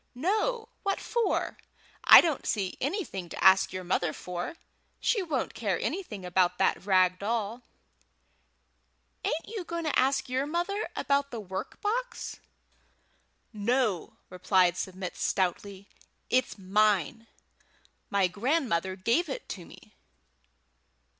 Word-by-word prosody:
"No! 435 - 0
What 395 -1 -1
for? 475 -1 -1 0.5
I - - +11
don't 320 -6 -2
see 195 -4 -1
anything 275 - -3
to - - -5
ask 190 0 +6
your 185 0 -5
mother 175 -2 0
for. 180 - -5 0.4
She 435 - +1
won't 315 -8 -2
care 200 -6 -1
anything 265 - -4
about 180 0 +2
that - - +1
rag 185 -2 +4
doll." 225 +2 -2 1.6
"Ain't 315 +2 -2
you 430 -4 -5
going 340 0 -4
to 310 - +1
ask 270 +2 +2
your 260 +2 -1
mother 350 +6 -2
about 280 0 +1
the 235 - -6
work 190 -2 -6
box?" 475 +3 -2 1.2
"No," 215 -3 0 0.2
replied 180 -1 +3
Submit 185 0 -5
stoutly. 195 +1 -1 0.4
"It's 255 -2 +1
mine; 210 +2 +1 0.8
my 200 -1 +3
grandmother 205 - 0
gave 235 - +1
it 270 - -5
to 180 -4 -6
me." - - -16
220 Hz, 120 wpm, -29 LUFS, -, 1.6 s, I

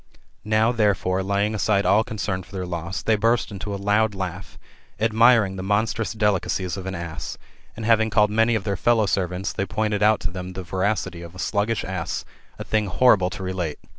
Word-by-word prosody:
Now, 110 +2 +2
therefore, 100 -5 +1
laying 100 +2 0
aside 100 -1 +1
all 100 +4 +4
concern 100 -4 -3
of 90 - -13
their 95 -2 -5
loss, 85 +1 -4
they 110 - +3
burst 115 +2 +1
into 100 +1 -6
a - - -2
loud 105 +1 +1
laugh, 95 0 -6 0.4
admiring 110 -2 +4
the - - -4
monstrous^^ 110 +3 -1
delicacies 95 -3 0
of 95 -1 -7
an 95 - -3
ass; 85 -2 -6 0.4
and 110 - -6
having 110 -1 +3
called 105 -1 +3
many 115 +2 +3
of 110 - -1
their 100 -1 -1
fellow 115 -1 +3
servants, 95 0 -1
they 100 - -2
pointed 105 -1 -1
out 105 +1 +4
to 90 -1 -3
them 90 0 -6
the 95 0 -6
voracity 95 -1 -2
of 85 +1 -10
a - - -10
sluggish 105 +3 -1
ass, 90 -3 -4 0.3
a - - -5
thing 110 -1 0
horrible 95 -2 +4
to 95 +1 -7
relate. 90 -5 -3
100 Hz, 195 wpm, -23 LUFS, 95-110 Hz, 0.4 s, all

